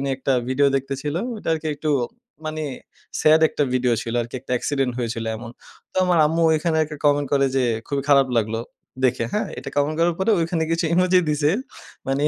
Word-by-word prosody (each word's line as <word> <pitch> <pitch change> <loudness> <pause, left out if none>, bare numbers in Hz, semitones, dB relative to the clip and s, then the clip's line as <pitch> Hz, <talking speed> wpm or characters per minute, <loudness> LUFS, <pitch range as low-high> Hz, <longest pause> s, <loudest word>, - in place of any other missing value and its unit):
উনি 140 - -2
একটা 135 0 -1 0.2
ভিডিও 140 +2 +3
দেখতেছিল 135 +2 -3 0.2
ওটা 205 - -7
আরকি 160 -1 -2
একটু 155 +1 -2 0.5
মানে 155 0 -3 0.6
স্যাড 155 +1 +5
একটা 145 - -1
ভিডিও 125 -1 +2
ছিল 115 +1 -4
আরকি 120 +2 -10
একটা - - -6
এক্সিডেন্ট 135 -1 -1
হয়েছিল 115 -1 -3
এমন। 115 +1 -8 0.4
তো - - -15
আমার 180 -2 +3
আম্মু 165 +2 0
ঐখানে 160 +1 0
একটা 150 0 -8
কমেন্ট 145 -1 +3
করে 140 -1 +4
যে, 130 - +3 0.3
খুবই 140 -1 -1
খারাপ 140 -2 +6
লাগলো 115 0 0 0.5
দেখে 125 -2 +2
হ্যাঁ, 210 - 0
এটা - - -6
কমেন্ট 145 +2 +1
করার 170 0 +3
পরে 190 +4 +1
ওখানে 165 0 0
কিছু 165 +1 0
ইমোজি 180 +1 +4
দিছে। 150 0 +2 0.6
মানে 135 +1 0
145 Hz, 190 wpm, -22 LUFS, 130-160 Hz, 0.6 s, খারাপ